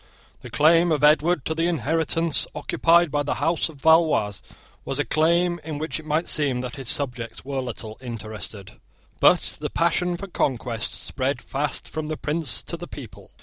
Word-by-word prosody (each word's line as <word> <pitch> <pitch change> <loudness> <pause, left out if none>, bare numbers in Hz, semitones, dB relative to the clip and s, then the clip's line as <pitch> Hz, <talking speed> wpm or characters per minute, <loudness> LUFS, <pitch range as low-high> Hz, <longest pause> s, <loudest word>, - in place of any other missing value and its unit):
The - - -9
claim 165 +3 +4
of 150 -2 +1
Edward 155 +1 +4
to 160 - 0
the 165 +1 0
inheritance 165 0 0
occupied 165 +2 +3
by 145 0 +1
the 145 - -1
House 165 +4 0
of 150 -4 -13
Valois 160 - +3 0.4
was 135 - -2
a 145 - +1
claim 170 +2 +2
in 155 -1 -5
which 155 +2 -3
it 155 - -12
might 155 +3 0
seem 140 -5 +1
that 125 0 -6
his 135 -4 -5
subjects 125 -4 -3
were 135 -1 -2
little 115 -3 -6
interested. 110 -4 -6 0.4
But - - +4
the - - -3
passion 175 +1 +1
for 195 - -6
conquest 125 - -2
spread 135 -1 -2
fast 140 +3 -3
from 155 0 -4
the 155 0 -3
prince 150 -4 -1
to - - -5
the - - -8
people. - - -11
150 Hz, 180 wpm, -24 LUFS, 130-165 Hz, 0.4 s, claim